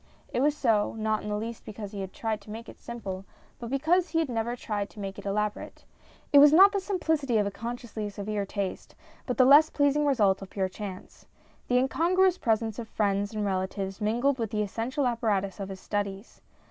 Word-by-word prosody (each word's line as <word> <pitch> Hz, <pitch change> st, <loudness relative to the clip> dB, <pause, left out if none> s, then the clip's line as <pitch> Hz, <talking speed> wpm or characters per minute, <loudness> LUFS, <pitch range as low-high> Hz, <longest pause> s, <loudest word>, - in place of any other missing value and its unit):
It 245 Hz, -, +1 dB
was 295 Hz, +1 st, +2 dB
so, 220 Hz, -7 st, +2 dB
not 215 Hz, 0 st, 0 dB
in 210 Hz, -, -6 dB
the 210 Hz, -, -1 dB
least 225 Hz, +2 st, -5 dB
because 210 Hz, -1 st, -7 dB
he 200 Hz, -2 st, -5 dB
had 190 Hz, -1 st, -5 dB
tried 220 Hz, -1 st, -3 dB
to 200 Hz, -, -16 dB
make 225 Hz, +2 st, -7 dB
it -, -, -12 dB
simple, 195 Hz, -5 st, -6 dB, 0.4 s
but 235 Hz, -, -6 dB
because 320 Hz, +7 st, +2 dB
he 325 Hz, -, -1 dB
had 325 Hz, -4 st, +1 dB
never 235 Hz, 0 st, -1 dB
tried 210 Hz, -4 st, -3 dB
to -, -, -14 dB
make 195 Hz, 0 st, -5 dB
it 200 Hz, -, -7 dB
elaborate. 210 Hz, +1 st, -3 dB, 0.5 s
It 285 Hz, -, +9 dB
was 290 Hz, 0 st, +9 dB
not 385 Hz, +6 st, +8 dB
the 400 Hz, -, 0 dB
simplicity 320 Hz, -, 0 dB
of 210 Hz, -, +2 dB
a 200 Hz, -, -2 dB
consciously 230 Hz, -1 st, -5 dB
severe 205 Hz, 0 st, -3 dB
taste, 200 Hz, -1 st, -5 dB, 0.3 s
but 250 Hz, -, -2 dB
the 255 Hz, -, +6 dB
less 295 Hz, +4 st, +7 dB
pleasing 290 Hz, 0 st, +2 dB
result 205 Hz, -9 st, +3 dB
of 195 Hz, -, -8 dB
pure 190 Hz, -2 st, -1 dB
chance. 190 Hz, -1 st, -9 dB, 0.4 s
The 250 Hz, -, +3 dB
in 255 Hz, +1 st, +3 dB
congruous 370 Hz, +4 st, +2 dB
presents 225 Hz, -1 st, 0 dB
of 230 Hz, -, -6 dB
friends 205 Hz, 0 st, -1 dB
and 210 Hz, -1 st, -1 dB
relatives 190 Hz, +1 st, -3 dB
mingled 240 Hz, +6 st, +1 dB
with 225 Hz, -2 st, -1 dB
the 210 Hz, -1 st, 0 dB
essential 235 Hz, +7 st, -2 dB
apparatus 210 Hz, -5 st, 0 dB
of 195 Hz, -1 st, -5 dB
his 190 Hz, -1 st, -7 dB
studies. 200 Hz, +1 st, -4 dB
220 Hz, 210 wpm, -28 LUFS, 200-260 Hz, 0.5 s, It